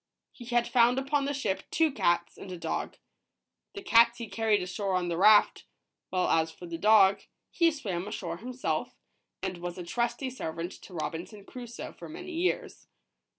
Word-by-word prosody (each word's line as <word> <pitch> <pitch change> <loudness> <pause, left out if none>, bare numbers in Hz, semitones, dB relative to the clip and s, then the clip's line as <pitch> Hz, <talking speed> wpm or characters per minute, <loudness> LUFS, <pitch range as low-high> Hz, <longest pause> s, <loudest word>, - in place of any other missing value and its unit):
He 240 - -12
had 240 0 +1
found 245 0 +4
upon 275 +1 0
the 285 - -1
ship 205 -8 -1
two 320 -2 +2
cats 175 -9 +1
and 190 - -10
a 180 - -5
dog. - - -3 0.8
The 400 - -7
cats 235 -5 +5
he 235 - -6
carried 220 -3 +1
ashore 190 +1 -2
on 180 -1 0
the 170 - -2
raft, 210 +2 +5 0.4
while 185 -1 +1
as 160 0 +2
for 175 - -11
the 170 -1 -6
dog, 200 -1 +5 0.3
he 335 -1 +4
swam 200 - -4
ashore 170 -5 -4
himself, 250 - -3 0.5
and 185 -2 -3
was 175 0 -5
a 180 - -5
trusty 240 +7 -2
servant 170 -7 -5
to 185 - -12
Robinson 175 +6 -5
Crusoe 240 0 -8
for - - -11
many 360 +3 -8
years. 350 +2 -2
215 Hz, 175 wpm, -29 LUFS, 180-255 Hz, 0.8 s, cats